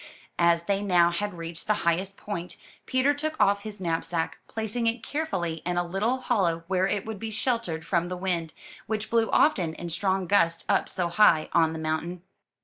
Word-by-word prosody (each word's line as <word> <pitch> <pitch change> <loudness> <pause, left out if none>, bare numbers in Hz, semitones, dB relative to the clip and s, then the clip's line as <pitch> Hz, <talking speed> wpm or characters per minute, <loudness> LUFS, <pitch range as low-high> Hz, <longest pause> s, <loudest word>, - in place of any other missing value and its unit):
As 170 -1 +4
they 200 +2 0
now 175 -4 +4
had 205 +2 -3
reached 165 0 -7
the 215 - +3
highest 185 +4 +1
point, 180 -4 -5 0.3
Peter 260 +3 +3
took 310 +2 -3
off 200 0 +4
his 210 -1 -7
knapsack, 165 -1 -2
placing 225 +1 -2
it 230 0 -1
carefully 175 - -2
in 175 0 -2
a 175 - +1
little 220 +9 0
hollow 175 -10 +1
where 185 0 +2
it 200 0 -1
would 220 -2 -6
be 225 - -4
sheltered 220 -8 -2
from 175 -2 +1
the 180 0 -4
wind, 175 -3 -2 0.3
which 215 0 -3
blew 230 -1 +3
often 175 - +3
in 175 - -6
strong 190 +2 0
gusts 170 -3 +2
up - - +2
so 180 -2 -1
high 170 -4 +4
on 160 -1 +4
the - - -5
mountain. 160 +3 -3
185 Hz, 190 wpm, -27 LUFS, 170-215 Hz, 0.3 s, As